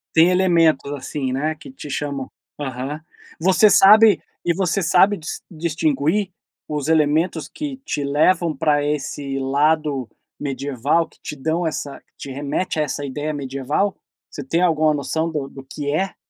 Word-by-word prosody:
Tem 165 +2 +6
elementos, 165 -6 +3
assim, 135 -1 -4
né, 155 +4 -1
que 155 - -13
te 260 - -10
chamam 140 -1 -4 0.3
aham. 135 +2 -5 0.4
Você 190 +4 +5
sabe 210 -2 +7 0.2
e 170 - +2
você 190 0 0
sabe 195 +5 +4
dis 155 - -7
distinguir 160 +3 0 0.4
os 150 -1 -2
elementos 160 +1 +1
que 290 -3 -5
te - - -2
levam 155 +3 +2
pra 150 0 +2
esse 140 -1 -3
lado 140 -1 +1 0.3
medieval, 140 +3 -1
que - - -26
te 150 - -6
dão 160 +4 -1
essa 145 -2 -4
que - - -40
te 135 - -8
remete 145 +5 -2
a - - +3
essa 145 0 -4
ideia 145 +3 -3
medieval? 140 +7 -2 0.3
Você 145 - -6
tem 165 +6 0
alguma 155 -3 +3
noção 160 +3 -1
do 145 -4 -4
do 135 -1 -11
que 145 -1 -3
é? 190 +4 -1
150 Hz, 160 wpm, -21 LUFS, 140-170 Hz, 0.4 s, sabe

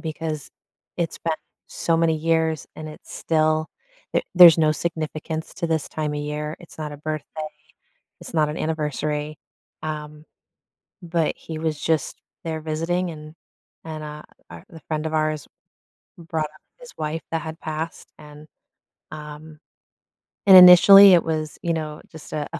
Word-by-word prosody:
because 155 -2 -5 0.5
it's 170 -2 -3
been 165 -1 -1 0.3
so 165 -1 0
many 165 -1 +2
years 160 -1 0
and 155 - -7
it's 150 - -12
still 155 0 +1 0.5
th - - +1
there's 175 -2 +9
no 155 -1 +3
significance 160 0 -4
to 170 - -3
this 160 -2 -1
time 150 -1 -3
of 145 - -3
year, 150 +1 -4
it's 170 - -15
not 150 -1 -5
a - - -8
birthday, 155 0 -5 0.7
it's - - -9
not 155 -2 +2
an 150 - -5
anniversary," 150 -1 -3 0.5
um, 150 -1 -6 0.8
but 165 -2 -1
he 160 -1 -8
was 155 -2 -2
just 160 -3 -1 0.3
there 160 -1 -3
visiting 165 +3 -2
and 155 0 -11 0.5
and 155 -1 -7
a 150 0 -9 0.5
the 160 - -12
friend 155 0 -2
of 160 - -4
ours 155 -1 -1 0.7
brought 165 -2 -3
up 155 0 -14 0.2
his - - -12
wife 155 +1 -3
that 165 -1 -1
had 160 +1 -8
passed, 155 +1 -6
and, 150 0 -13 0.6
um 150 0 -10 0.9
and 190 - +10
initially 190 +2 +10
it 170 - +5
was, 155 -1 -3
you 170 -1 0
know, 155 -2 -5
just 155 - -12
a 150 -1 -3
a 170 - -4
155 Hz, 155 wpm, -23 LUFS, 155-165 Hz, 0.9 s, and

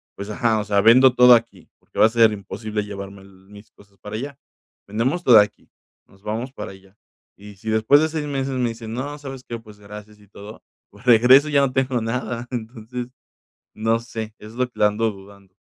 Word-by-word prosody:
pues, 100 +1 -8
ajá, 110 +1 0
o - - -2
sea, 100 -1 +2
vendo 125 +4 +6
todo 125 0 +8
aquí, 115 0 -4
porque - - -11
va - - +7
a - - +4
ser 115 -1 +4
imposible 105 +1 -5
llevarme 100 -1 -9
mis 100 +2 -17
cosas 100 -1 -23
para 105 +2 -8
allá. 140 +3 -7 0.5
Vendemos 130 - -1
todo 120 -4 +8
aquí, 105 0 -1 0.4
nos 95 - -23
vamos 115 +5 -4
para - - -7
allá, 95 +1 -19 0.4
y 100 0 -13
si 110 +3 -7
después 110 +7 +4
de 160 - +2
6 155 -1 -4
meses 135 -1 -3
me 125 -2 0
dicen: 115 -1 -8
"No, 145 +4 -5
¿sabes 135 -3 -9
qué? 115 -1 -7
Pues, 110 -2 -16
gracias 105 +1 -12
y 105 - -21
todo". 105 +2 -12 0.3
Pues, 100 +3 -18
regreso 125 +5 +6
y - - -6
ya 140 - +5
no 130 -2 0
tengo 130 -2 0
nada. 120 +1 -4
Entonces, 120 0 -6 0.7
no 115 +1 0
sé, 110 -2 -7
es 105 +1 -12
lo 125 0 -1
que - - -21
le - - +3
ando 110 +2 0
dudando. 100 -1 -16
110 Hz, 210 wpm, -21 LUFS, 105-125 Hz, 0.7 s, todo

